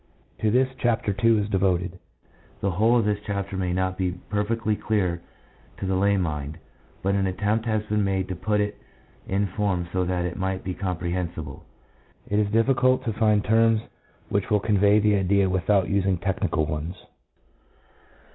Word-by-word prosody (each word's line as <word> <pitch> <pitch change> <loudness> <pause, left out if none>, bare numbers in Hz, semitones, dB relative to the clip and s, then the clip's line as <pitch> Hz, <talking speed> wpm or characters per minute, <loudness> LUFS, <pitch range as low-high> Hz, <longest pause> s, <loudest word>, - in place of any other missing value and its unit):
To 110 - +1
this 130 +4 +3
Chapter 115 -4 0
II. 115 -1 +5
is 100 - -2
devoted. 95 -2 0 0.6
The 100 - 0
whole 110 +7 +3
of 115 - +2
this 105 -1 0
chapter 100 -1 -3
may 90 -1 -1
not 95 +1 -1
be 90 -1 0 0.2
perfectly 105 +1 0
clear 95 -6 -1 0.6
to - - -4
the 95 - 0
lay 100 +2 +2
mind, 75 -4 -3 0.5
but 100 +1 +1
an 100 -1 +1
attempt 105 +4 -1
has 110 -1 0
been 105 -1 0
made 95 -1 0
to 95 - -3
put 105 +4 0
it 105 0 -3 0.5
in 100 +2 +1
form 95 -2 -1
so 95 0 +1
that 90 0 -1
it 90 - -4
might 95 0 -2
be 95 - -3
comprehensible. 85 -5 -4 0.6
It 105 - +1
is 105 -1 +1
difficult 130 +3 +3
to 115 - -1
find 105 -1 +2
terms 115 +1 +3 0.5
which 100 -1 -1
will 105 - +3
convey 105 0 +3
the 105 0 +3
idea 100 +1 +2
without 95 +1 +2
using 95 -2 +1
technical 90 -3 -1
ones. 75 +4 -4
100 Hz, 170 wpm, -25 LUFS, 90-105 Hz, 0.6 s, II